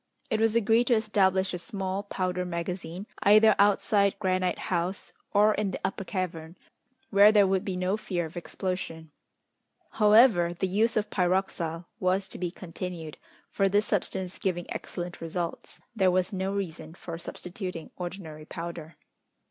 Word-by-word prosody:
It 220 Hz, -, +1 dB
was 225 Hz, 0 st, +3 dB
agreed 230 Hz, +1 st, +4 dB
to 240 Hz, -, +5 dB
establish 190 Hz, -4 st, +2 dB
a 180 Hz, -, -3 dB
small 195 Hz, 0 st, -3 dB
powder 185 Hz, -3 st, -2 dB
magazine, 175 Hz, +1 st, -4 dB, 0.2 s
either 215 Hz, +2 st, +7 dB
outside 200 Hz, 0 st, +3 dB
Granite 185 Hz, -2 st, 0 dB, 0.2 s
House 175 Hz, +3 st, -2 dB, 0.2 s
or 210 Hz, +1 st, +5 dB
in 210 Hz, -1 st, -1 dB
the 190 Hz, -, -4 dB
Upper 195 Hz, -, -2 dB
Cavern, 175 Hz, -3 st, -4 dB, 0.5 s
where 205 Hz, +1 st, +7 dB
there 205 Hz, -2 st, +6 dB
would 190 Hz, -1 st, +1 dB
be 185 Hz, -2 st, -3 dB
no 185 Hz, +3 st, 0 dB
fear 180 Hz, -5 st, -2 dB
of 160 Hz, -, -10 dB
explosion. 175 Hz, -3 st, -4 dB, 0.8 s
However, 210 Hz, -5 st, +5 dB
the 190 Hz, -, -1 dB
use 220 Hz, +5 st, +1 dB
of 210 Hz, 0 st, -1 dB
pyroxyle 175 Hz, -3 st, 0 dB
was 190 Hz, +1 st, +1 dB
to -, -, -7 dB
be 180 Hz, -1 st, -1 dB
continued, 170 Hz, -2 st, -7 dB, 0.3 s
for 195 Hz, -1 st, +2 dB
this 205 Hz, +2 st, +2 dB
substance 190 Hz, -2 st, -2 dB
giving 175 Hz, -2 st, -1 dB
excellent 175 Hz, 0 st, -6 dB
results, 165 Hz, +1 st, -4 dB, 0.2 s
there 190 Hz, -4 st, +4 dB
was 185 Hz, +1 st, +1 dB
no 190 Hz, 0 st, -1 dB
reason 170 Hz, -5 st, -5 dB
for 165 Hz, -2 st, -7 dB
substituting 180 Hz, -1 st, -6 dB
ordinary 175 Hz, -4 st, -7 dB
powder. 165 Hz, -1 st, -7 dB
185 Hz, 150 wpm, -28 LUFS, 175-200 Hz, 0.8 s, either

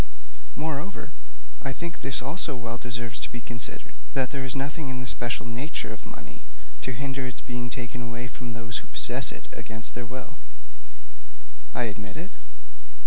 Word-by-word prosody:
Moreover, 160 Hz, +5 st, 0 dB, 0.5 s
I 135 Hz, -, +2 dB
think 170 Hz, +4 st, -2 dB
this 130 Hz, -1 st, +4 dB
also 145 Hz, +1 st, +2 dB
well 120 Hz, -1 st, -1 dB
deserves 120 Hz, -1 st, 0 dB
to -, -, 0 dB
be 120 Hz, -, -1 dB
considered 120 Hz, 0 st, 0 dB, 0.2 s
that 130 Hz, -2 st, +5 dB
there 140 Hz, -2 st, +1 dB
is 130 Hz, 0 st, +1 dB
nothing 140 Hz, +2 st, +1 dB
in 130 Hz, -1 st, +1 dB
the 125 Hz, -, -1 dB
special 120 Hz, 0 st, +2 dB
nature 120 Hz, 0 st, 0 dB
of 110 Hz, -, -7 dB
money -, -, -7 dB, 0.4 s
to 130 Hz, -, +1 dB
hinder 135 Hz, +2 st, +1 dB
its 125 Hz, -, -3 dB
being 120 Hz, -1 st, 0 dB
taken 120 Hz, 0 st, 0 dB
away 120 Hz, +1 st, -1 dB
from 120 Hz, -1 st, -3 dB
those 115 Hz, 0 st, +1 dB
who -, -, -10 dB
possess -, -, +4 dB
it -, -, -5 dB
against 110 Hz, 0 st, +3 dB
their 120 Hz, 0 st, -2 dB
will.' 125 Hz, +1 st, -4 dB, 1.4 s
'I 125 Hz, -, +5 dB
admit 105 Hz, +1 st, -1 dB
it.' 175 Hz, +5 st, -2 dB
125 Hz, 170 wpm, -31 LUFS, 120-135 Hz, 1.4 s, that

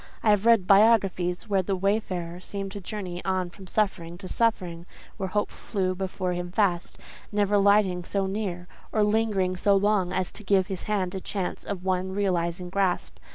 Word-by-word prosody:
I 215 Hz, -, +5 dB
have 210 Hz, +2 st, +2 dB
read 230 Hz, -5 st, +5 dB
biographies 195 Hz, -3 st, +3 dB
where 195 Hz, -2 st, +2 dB
the 190 Hz, +1 st, -1 dB
wayfarer 185 Hz, -3 st, -1 dB
seemed 195 Hz, +1 st, -6 dB
to 200 Hz, 0 st, -7 dB
journey 185 Hz, -3 st, -5 dB
on 185 Hz, -2 st, -1 dB
from 190 Hz, +1 st, -13 dB
suffering 175 Hz, -5 st, -1 dB
to 185 Hz, +1 st, -8 dB
suffering; 180 Hz, -7 st, -1 dB, 0.3 s
where 190 Hz, -3 st, -3 dB
Hope 205 Hz, +2 st, -1 dB
flew 185 Hz, -3 st, -2 dB
before 185 Hz, -1 st, -3 dB
him 175 Hz, 0 st, -4 dB
fast, 185 Hz, -3 st, 0 dB, 0.3 s
never 205 Hz, -1 st, +1 dB
alighting 200 Hz, -3 st, +4 dB
so 195 Hz, +2 st, -1 dB
near, 190 Hz, -3 st, -3 dB, 0.2 s
or 215 Hz, -, +2 dB
lingering 210 Hz, -3 st, +1 dB
so 200 Hz, +2 st, +3 dB
long, 195 Hz, -2 st, +2 dB
as 185 Hz, -1 st, -1 dB
to 210 Hz, -, -10 dB
give 195 Hz, -1 st, +3 dB
his 190 Hz, -2 st, -5 dB
hand 190 Hz, -3 st, 0 dB
a 190 Hz, -, -4 dB
chance 190 Hz, -2 st, -4 dB
of 195 Hz, -3 st, -5 dB
one 185 Hz, 0 st, 0 dB
realizing 180 Hz, -3 st, -1 dB
grasp. 190 Hz, -2 st, -1 dB
190 Hz, 180 wpm, -26 LUFS, 180-205 Hz, 0.3 s, I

